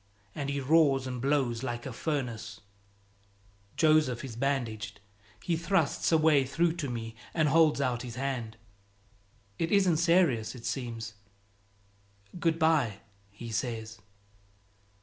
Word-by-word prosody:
and 140 -1 -4
he 140 0 -1
roars 140 -1 +3
and 125 -2 -4
blows 135 -4 +1
like 120 -2 -4
a 130 - -5
furnace. 115 -6 -4 1.2
Joseph 155 -6 +3
is 120 -4 -8
bandaged. 120 -4 -2 0.4
He 170 - 0
thrusts 165 -2 +1
a 160 - +6
way 155 -3 +4
through 165 +5 +1
to 145 -6 -3
me 115 -2 -5 0.2
and 155 -3 +3
holds 160 -1 +4
out 125 -3 0
his 120 -2 -7
hand: 125 -4 -3 1.0
"It 165 - -1
isn't 190 -5 +4
serious, 165 -10 +2
it 120 - -10
seems; 115 -3 -4 1.3
good 165 -2 +1
by," 150 - +2 0.3
he 115 +3 -9
says. 110 0 -3
135 Hz, 130 wpm, -29 LUFS, 115-155 Hz, 1.3 s, a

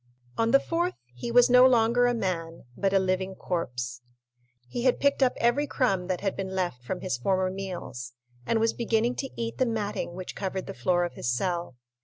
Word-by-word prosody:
On 225 0 +1
the 275 - +6
fourth, 345 +4 -1 0.2
he 125 - -5
was 245 +1 +6
no 250 +1 +7
longer 245 0 +4
a 245 - +1
man, 165 -6 -3
but 195 -1 +1
a 195 - +4
living 190 0 0
corpse. 125 -10 -3 0.7
He 240 - -4
had 255 0 +2
picked 280 0 +2
up 260 -1 +4
every 255 +5 +2
crumb 195 -12 0
that 185 -2 -2
had 195 -1 -1
been 190 -1 -4
left 175 -10 -2
from 180 +9 -4
his 180 -10 -2
former 185 +6 +1
meals, 180 -11 -6 0.3
and 225 - +1
was 225 0 +2
beginning 230 +1 +1
to 270 - -3
eat 230 0 -3
the 255 - +3
matting 210 -5 -2
which 185 0 -6
covered 190 -1 -3
the - - -6
floor 175 +8 +1
of 175 - -3
his 120 - -2
cell. 170 0 -2
195 Hz, 205 wpm, -27 LUFS, 175-235 Hz, 0.7 s, no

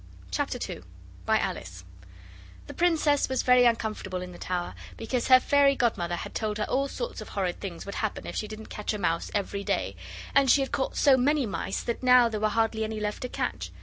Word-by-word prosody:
CHAPTER 90 - -1
II - - -7 0.5
by - - +4
Alice 90 +1 -4 0.8
The - - -9
Princess 315 -5 +2
was 260 - 0
very 250 -1 +6
uncomfortable 215 -5 -1
in 180 - -8
the 175 - -12
tower, 180 - -3 0.2
because 245 - -2
her 255 -1 +8
fairy 280 +1 +4
godmother 180 -9 0
had - - -7
told 215 -1 -2
her 210 - -1
all 275 +1 +1
sorts - - -5
of - - -9
horrid 185 -3 -2
things 180 -4 -6
would 200 - -6
happen 215 -2 -3
if - - -6
she 215 - -2
didn't 215 +1 -8
catch 210 +1 -3
a - - -2
mouse 165 -4 -1
every 200 0 -2
day, - - -1 0.4
and 275 -1 +4
she 280 - +6
had 270 - -2
caught 265 - -2
so 275 -3 +5
many 280 +2 +2
mice 200 -2 -3
that 235 - -3
now 250 -1 +6
there 215 -2 -3
were 215 0 +2
hardly 225 0 0
any 220 0 -3
left 210 0 -3
to 250 - -4
catch. - - -3
220 Hz, 215 wpm, -27 LUFS, 200-260 Hz, 0.8 s, her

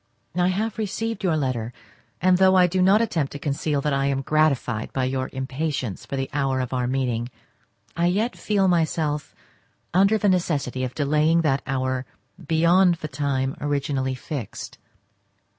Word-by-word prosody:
I 180 0 +2
have 215 +4 -1
received 225 +1 -3
your 170 -4 +2
letter, 125 -5 -2 0.5
and 185 0 +3
though 190 0 +5
I 180 -1 +6
do 185 +1 0
not 200 +5 +5
attempt 160 -11 -1
to - - -5
conceal 145 0 -1
that 150 0 0
I 135 0 +1
am 135 -1 -1
gratified 140 -7 +1
by 130 - 0
your 130 0 -1
impatience 130 - -3
for - - -4
the 135 0 -2
hour 135 -2 0
of 125 -1 -3 0.2
meeting, 125 -3 -1 0.7
I 170 +1 +2
yet 210 +7 0
feel 200 -2 +1
myself 155 -4 0 0.6
under 195 +4 +4
the 205 - +1
necessity 150 -9 0
of 125 -1 -4
delaying 155 +3 +2
that 140 -4 +1
hour 130 -1 -1 0.4
beyond 170 +3 +4
the 155 - -6
time 135 -3 -1
originally 140 -2 -1
fixed. 130 - -7
150 Hz, 160 wpm, -24 LUFS, 130-180 Hz, 0.7 s, I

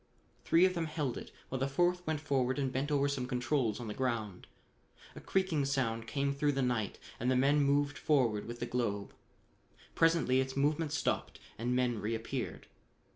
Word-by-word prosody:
Three 170 +3 +5
of 185 - +2
them 170 -2 -1
held 150 -5 -2
it, - - -7 0.2
while 130 - -3
the 135 - +1
fourth 175 +5 +1
went 160 -1 0
forward 135 -3 0
and 135 -2 -1
bent 135 +3 -1
over 140 -1 +2
some 135 -3 -2
controls 125 -3 0
on 120 - -6
the 105 - -3
ground. 115 -7 -2 0.7
A - - -9
creaking 185 -6 +1
sound 115 -5 -1
came 140 +1 0
through 145 +1 +1
the 135 -1 0
night 120 -5 -1 0.2
and 125 - 0
the 130 - +3
men 140 +3 +4
moved 145 +1 +2
forward 120 -9 +2
with 120 0 -6
the - - -2
globe. 115 -5 -2 0.8
Presently 165 -6 +3
its 130 +1 -4
movement 150 +2 +1
stopped - - -1 0.2
and 120 +2 0
men 125 -3 +1
reappeared. 115 +2 -3
135 Hz, 180 wpm, -33 LUFS, 120-145 Hz, 0.8 s, Three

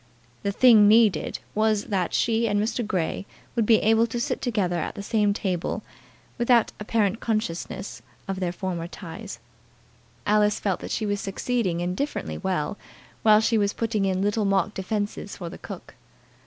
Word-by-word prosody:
The 200 - -1
thing 220 -1 +7
needed 215 -5 +4 0.2
was 215 -1 +2
that 190 -4 -1
she 230 0 +1
and 205 -1 +1
Mr. 220 +3 -1
Grey 190 -2 -2 0.3
should 230 -3 +1
be 225 - +7
able 225 +2 +4
to 240 - -3
sit 235 - -2
together 200 -8 0
at - - -4
the 200 - -6
same 210 -1 +2
table 190 -4 -2 0.6
without 240 -1 +4
apparent 210 0 0
consciousness 170 - -3 0.3
of 195 -1 -3
their 180 -2 -1
former 175 -2 -4
ties. 190 +3 -8 0.9
Alice 210 0 +3
felt 195 -3 -1
that - - -7
she 220 - -1
was 205 -1 -1
succeeding 195 -3 -1
indifferently 180 +12 -3
well 190 -1 -2 0.4
while 215 -1 +6
she 225 0 +2
was 200 0 +1
putting 220 -3 -1
in 190 0 0
little 205 +2 +1
mock 195 0 +1
defences 205 +1 -3
for 175 -3 -6
the - - -10
cook. - - -9
205 Hz, 165 wpm, -25 LUFS, 190-220 Hz, 0.9 s, thing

